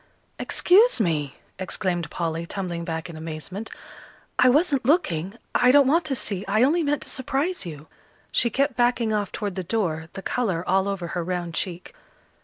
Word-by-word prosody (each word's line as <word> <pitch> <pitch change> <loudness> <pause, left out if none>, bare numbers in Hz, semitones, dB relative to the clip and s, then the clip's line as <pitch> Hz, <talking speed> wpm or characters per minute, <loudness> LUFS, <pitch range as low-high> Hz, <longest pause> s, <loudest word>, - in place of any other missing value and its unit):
"Excuse 415 - +4
me!" 155 -8 0 0.2
exclaimed 185 -2 -2
Polly, 165 -1 -3
tumbling 175 -3 -4
back 165 -1 -4
in 170 - -9
amazement. 160 +7 -6 0.7
"I 255 - +7
wasn't 290 0 +3
looking. 195 - +1 0.2
I 250 - +4
don't 280 +2 +7
want 325 +6 +3
to 275 - -1
see. 200 -6 -2
I 215 +4 +3
only 320 +6 +3
meant 295 -2 0
to - - -8
surprise 275 - -2
you." 150 -2 -8 0.5
She 235 - +3
kept 275 +3 0
backing 240 -2 +2
off 205 -2 -1
toward 205 -3 -3
the 185 0 -4
door, 165 -5 -1
the 195 - -7
colour 195 -9 -1
all 190 +1 +2
over 190 -4 -3
her 175 0 -2
round 175 -1 -3
cheek. 180 0 -4
195 Hz, 175 wpm, -24 LUFS, 170-255 Hz, 0.7 s, I